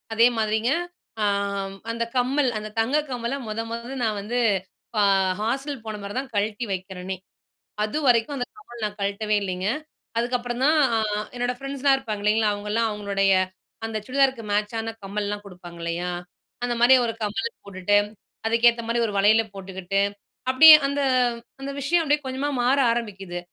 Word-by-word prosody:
அதேமாதிரிங்க 225 0 +3 0.5
அ - - +3 0.7
அந்த 235 0 -1
கம்மல் 260 +2 +2
அந்த 215 - -7
தங்க 245 +6 +2
கம்மல 245 +1 -2
மொத, 215 +1 -2
மொத 235 +2 -5
நான் 215 -2 0
வந்து 235 +5 -2 0.6
அ 205 - +5 0.4
ஹாஸ்டல் 265 +3 -2
போன 215 -1 -5
பிறகு 200 +4 -5
தான் 265 0 -7
கழட்டி 210 +3 0
வைக்கிறேனே! 185 0 -5 0.7
அதுவரைக்கும் 250 +1 +2
அந்த 245 -2 -2
கம்மல் 240 - -12
நான் 210 0 -7
கழட்டவே 200 +2 0
இல்லேங்க. 185 0 -2 0.5
அதுக்கப்புறம் 245 +1 -1
தான் 310 +1 +4 0.2
அ - - +2 0.4
என்னோடய 245 0 -1
ஃப்ரெண்ட்ஸ்லாம் 275 0 +2
இருப்பாங்க 215 -6 -5
இல்லேங்களா! 215 0 +3
அவங்கலாம் 210 +3 -1
அவுங்களுடைய 200 -2 +1 0.5
அந்த 220 -1 -3
சுடிதாருக்கு 265 -2 +2
மேட்சான 225 +2 -1
கம்மல்லாம் 205 +1 -3
குடுப்பாங்க 175 -2 -11
இல்லயா! 170 +1 -2 0.5
அந்த 245 -1 0
மாரி 245 +2 +7
ஒரு 225 - -1
கம்மல் 225 +2 -1 0.2
போட்டுட்டு, 200 +1 +1 0.5
அதுக்கேத்தமாரி 235 0 +3
ஒரு 210 - -4
வளையல் 215 +2 +4
போட்டுக்கிட்டு 190 0 -2 0.5
அப்பிடியே 310 +5 +10
அந்த, 280 +1 -1 0.6
அந்த 275 +1 -4
விஷயம் 320 +6 +2
அப்பிடியே 295 -1 +1
கொஞ்சமா 260 +2 -2
மாற 260 +3 +3
ஆரம்பிக்குது. 195 -6 -4
225 Hz, 145 wpm, -24 LUFS, 205-250 Hz, 0.7 s, அப்பிடியே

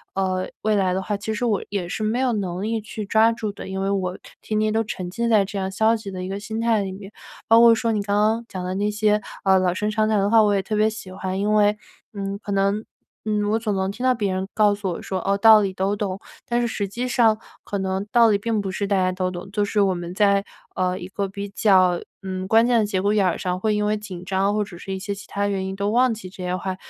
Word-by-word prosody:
呃， 185 -1 -1
未 215 0 +2
来 190 -2 +2
的 190 - -1
话， 205 +2 -2
其 215 +2 -4
实 215 - -3
我 215 -4 +1
也 195 -4 -3
是 200 - -4
没 220 +3 0
有 260 -1 +2
能 185 -3 -3
力 225 +2 -1
去 215 0 -6
抓 220 +3 +4
住 220 -2 -3
的， - - -9
因 190 0 -3
为 195 - 0
我 185 -2 -1 0.2
天 215 - -2
天 215 0 +1
都 225 - +2
沉 185 -3 -5
浸 235 +5 -2
在 215 -3 +5
这 200 +1 -6
样 190 0 -2
消 220 +4 +3
极 215 -3 -7
的 185 -1 -5
一 - - -4
个 195 +1 -4
心 220 +2 -5
态 230 -2 +2
里 195 -1 -3
面。 195 +1 -10 0.4
包 225 +1 +7
括 235 -1 +8
说 230 0 0
你 210 - 0
刚 200 0 -1
刚 220 +3 +2
讲 185 -1 -5
的 185 - -2
那 205 +2 0
些， 210 0 +2 0.2
呃， 190 0 +5
老 180 -1 +1
生 210 +3 -1
常 215 0 +1
谈 215 - +2
的 200 +1 +1
话， 225 0 +6
我 205 -1 +3
也 195 - +2
特 215 +3 -3
别 215 +1 +3
喜 220 -3 -8
欢。 190 0 -4
因 210 +1 +1
为， 210 0 +3 0.4
嗯， 200 -1 -4
可 205 - -6
能， 200 +2 +1 0.4
嗯， 210 -1 0
我 220 - +2
总 215 -3 -1
能 190 0 -1
听 225 - -10
到 255 0 +4
别 205 -4 -1
人 190 +1 -2
告 210 -1 +4
诉 200 -2 -4
我 170 - -5
说， 190 - -3
哦， 200 0 +2
道 220 +1 +8
理 195 -2 -1
都 190 +2 0
懂， 200 -2 -3 0.3
但 240 0 +1
是 240 - +1
实 205 -3 -2
际 240 +6 -4
上 230 -3 +3 0.3
可 200 - -4
能 190 +1 -2
道 235 -1 +6
理 205 - +3
并 220 0 -1
不 195 - -4
是 200 +2 -2
大 200 - +1
家 185 -1 +2
都 185 0 -1
懂， 180 +2 -7
就 205 +1 0
是 205 +1 +1
我 195 -2 +3
们 175 0 -6
在， 200 -1 +3 0.3
呃， 185 0 0
一 180 - -7
个 200 +1 -3
比 200 +1 -6
较， 185 -4 +3 0.2
嗯， 185 -1 -4
关 225 +3 +5
键 245 -1 +3
的 215 - +2
节 195 -3 -1
骨 205 +2 +2
眼 205 -2 +3
儿 180 - +1
上， 180 0 -2
会 215 +2 +1
因 210 0 0
为 210 +1 +1
紧 190 -4 -8
张 195 +2 +1
或 210 0 +1
者 190 -3 -10
是 195 +2 -6
一 - - -3
些 200 +1 -4
其 200 - -11
它 200 0 -1
原 195 -2 -2
因 190 0 -4
都 200 +1 -1
忘 245 +1 +3
记 210 -4 -8
这 185 0 -9
些 180 0 -1
话。 185 0 -3
200 Hz, 310 characters per minute, -23 LUFS, 190-215 Hz, 0.4 s, 括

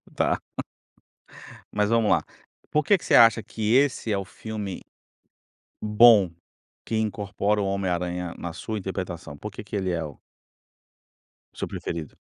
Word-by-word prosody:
Tá. - - +1 1.3
Mas 105 0 +1
vamos 115 -2 +3
lá. - - +3 0.5
Por 150 - +2
que 200 +7 +4
que - - -12
você - - +4
acha 115 -1 +7
que 110 0 -1
esse 135 -4 +2
é 100 - +2
o 100 - -3
filme, 105 -1 -6 1.0
bom, 105 -3 +6 0.5
que 115 - -2
incorpora 105 -1 0
o 100 - 0
Homem 95 -1 -1
Aranha 90 0 -2
na 85 - -5
sua 110 +5 -4
interpretação? 90 -6 -5
Por 105 +9 -7
que 105 - -9
que 105 - -5
ele 95 -2 -1
é, 85 -2 -1
o 75 -3 -9 1.4
seu - - -4
preferido? 80 -3 -5
100 Hz, 150 wpm, -25 LUFS, 90-110 Hz, 1.4 s, acha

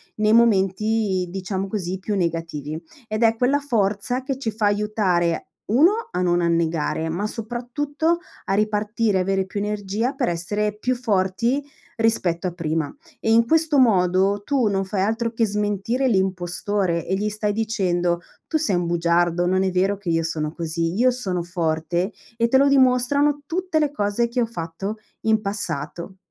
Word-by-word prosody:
nei 215 0 +2
momenti, 210 -3 +2
diciamo, 190 +1 -3
così 190 -2 -3
più 205 +2 -2
negativi. 165 -4 -3 0.3
Ed 215 +1 -1
è 225 0 +4
quella 265 +4 +2
forza 230 -2 0
che 270 -1 -3
ci 235 -5 -2
fa 215 0 -1
aiutare: 205 -5 +1 0.2
1, 345 - +3
a 180 - -1
non 175 -1 +2
annegare, 165 -1 0
ma 175 +6 -2
soprattutto 250 +9 -2 0.3
a - - -1
ripartire, 210 0 +1
avere 190 +1 0
più 190 +2 -5
energia, 210 +4 -2
per 265 -3 -1
essere 205 +5 -2
più 250 +4 0
forti 230 +3 0 0.3
rispetto 195 -6 +1
a 180 - 0
prima. 160 -3 -2 0.3
E 225 - 0
in 230 +1 +5
questo 320 -1 +3
modo 195 -3 +3
tu 270 -6 +2
non 195 -1 +1
fai 190 0 -2
altro 225 +3 0
che 225 0 +1
smentire 210 +5 0
l'impostore 190 -2 0
e 190 - +1
gli 210 +2 -1
stai 210 0 -1
dicendo: 180 -6 0 0.3
"Tu 320 - +1
sei 260 -12 0
un 175 0 0
bugiardo, 170 +1 +2
non 185 +1 +2
è 190 - +1
vero 190 +2 +1
che 195 -3 -5
io 165 0 +2
sono 155 -2 -2
così, 165 0 -2
io 245 +6 +4
sono 200 -8 -2
forte, 170 +2 -1 0.3
e 235 - +3
te 265 - +4
lo 280 - +5
dimostrano 275 +2 +3
tutte 360 -1 0
le 300 -1 +2
cose 210 -2 0
che 240 +1 -1
ho - - +3
fatto 195 0 -5 0.2
in 220 -1 +2
passato". 190 -3 -4
205 Hz, 165 wpm, -23 LUFS, 180-230 Hz, 0.3 s, in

